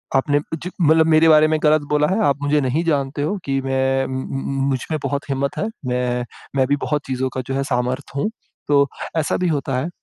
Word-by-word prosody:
आपने 145 +2 +3 0.2
ज 180 - -4
मतलब 160 0 +5
मेरे 160 0 +5
बारे 155 0 +6
में 155 0 +1
गलत 155 0 +4
बोला 150 0 +3
है, 190 +6 0
आप 140 0 +1
मुझे 145 +1 +2
नहीं 135 +6 0
जानते 145 -3 -1
हो 190 +8 -1
कि 135 -1 0
मैं 135 0 +1
म - - -7
म 135 +1 -2
मुझमें 135 +4 -2
बहुत 140 0 -3
हिम्मत 140 0 -1
है, 210 - -1 0.2
मैं 125 -1 -1 0.3
मैं 130 - +3
भी 145 - +2
बहुत 150 -1 0
चीज़ों 130 0 -1
का 130 - -1
जो 135 - -2
है 135 - 0
सामर्थ्य 130 +1 -2
हूँ। 210 - 0 0.4
तो 140 -1 +4 0.3
ऐसा 155 - +1
भी 180 - 0
होता 140 -4 -1
है 140 +6 -2
140 Hz, 220 wpm, -21 LUFS, 135-155 Hz, 0.4 s, बारे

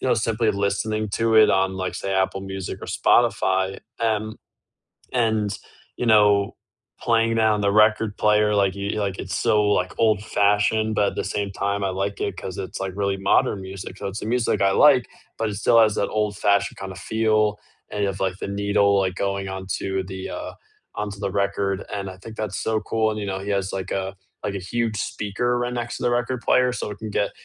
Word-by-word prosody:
you - - -1
know, 125 - +4
simply 115 0 +1
listening 105 +2 -1
to 115 +2 +1
it 110 -1 +7
on, 95 0 +2
like 95 -1 -3
say 95 - -3
Apple 95 0 0
Music 95 -1 -5
or - - -7
Spotify, 95 0 +2 0.2
and 110 -1 -1 0.8
and, 110 -4 +1 0.4
you 125 - -2
know, 105 -2 +4 0.5
playing 115 -1 +2
down 110 -2 +3
the 100 - +2
record 110 0 +3
player, 105 0 +3
like 100 -2 +2
you 100 +1 -3
like, 100 -2 -2
it's - - -4
so, 105 -1 +3
like, 95 -3 +1
old-fashioned, 110 0 +2
but 100 -1 +2
at - - -12
the - - -1
same 100 -1 -2
time, 100 +1 -2
I - - +1
like 100 +2 -3
it 100 -3 -2
'cause 95 -1 -6
it's, 95 - -5
like, 95 -1 -3
really 100 -1 0
modern 95 +1 +2
music, 95 0 -8
so - - -6
it's 100 +2 -5
the - - -5
music 120 -3 +1
I 100 - +4
like, 130 0 +5 0.3
but 115 -1 0
it 105 - -5
still 115 +2 +4
has 110 -2 +4
that - - +1
old-fashioned 100 -1 0
kinda 95 -1 -6
feel, 110 +1 +1 0.3
and 105 - -3
you 100 - +2
have, 95 0 -5
like, 95 -1 -1
the - - -4
needle, 100 0 +2
like, 95 -1 0
going 100 -1 -2
onto 95 0 -3
the, 95 0 -6
uh - - -6 0.4
onto 105 -1 -4
the 100 - -1
record, 100 -1 -1
and 100 -1 -3
I 95 - -10
think 110 +4 -11
that's 105 -3 -3
so 110 -1 0
cool, 110 0 0
and, 110 - -4
you 100 - -4
know, 95 -1 -2
he 100 - -5
has, 100 -1 -1
like, 95 -1 -4
a 95 0 -3 0.3
like, 100 - -2
a - - -2
huge 110 +4 -2
speaker 105 +4 -1
right 120 0 -2
next 120 -1 -4
to - - -8
the 120 - +2
record 120 +1 -1
player, 125 +1 +3
so 125 - -4
it 105 - -8
can 110 -1 -6
get 100 0 0
100 Hz, 215 wpm, -23 LUFS, 95-110 Hz, 0.8 s, it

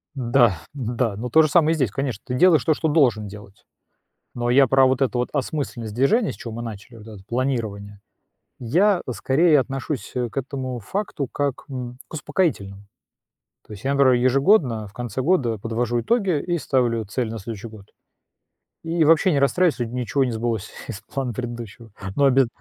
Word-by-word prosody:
Да, 120 - +3 0.2
н-да, 120 -4 -2
ну, 125 +3 -4
то 160 +7 +6
же 155 - +2
самое 160 0 +4
и - - 0
здесь, 130 -10 0
конечно, 130 -5 -3
ты 125 - -4
делаешь 160 -1 +5
то, 155 - +4
что 160 - -1
должен 125 -9 +2
делать, 100 -1 -13 0.7
но 120 0 -1
я 135 +2 +6
про 135 +1 +4
вот 130 +1 +1
эту 125 -1 0
вот 125 - 0
осмысленность 130 -6 -3
движения, 195 - +2
с - - -12
чего 115 - -8
мы 115 - -6
начали, 115 +1 -8
вот 110 0 -13
это 105 -3 -11
планирование, 110 -5 -3 0.6
я 180 - +2
скорее 140 - +3
отношусь, 135 -3 -4
э, 125 -1 -1
к - - -20
этому 130 -2 -4
факту 150 - -4
как, 140 -2 -2
м, 125 -2 -6
к - - -11
успокоительному. 140 - -2 0.8
То - - -12
есть 105 +4 -10
я, 140 - +1
например, 140 -2 +4
ежегодно 130 - +3
в 100 - -14
конце 120 +1 -5
года 130 -8 +1
подвожу 115 +3 -1
итоги 195 - +1
и 175 +2 -1
ставлю 120 -6 0
цель 110 +4 -3
на 115 0 -5
следующий 110 +2 -7
год 105 -3 -14 1.0
и 165 0 +1
вообще 165 +4 +4
не 145 - +2
расстраиваюсь, 165 +4 +2
если 115 -1 -3
ничего 125 +2 0
не 125 - -1
сбылось 110 -2 -3 0.2
из 105 -5 -6
плана 130 +1 -4
предыдущего. 120 -1 -7 0.3
Но 140 - +3
обяз 135 -1 +5
125 Hz, 185 wpm, -22 LUFS, 115-140 Hz, 1.0 s, то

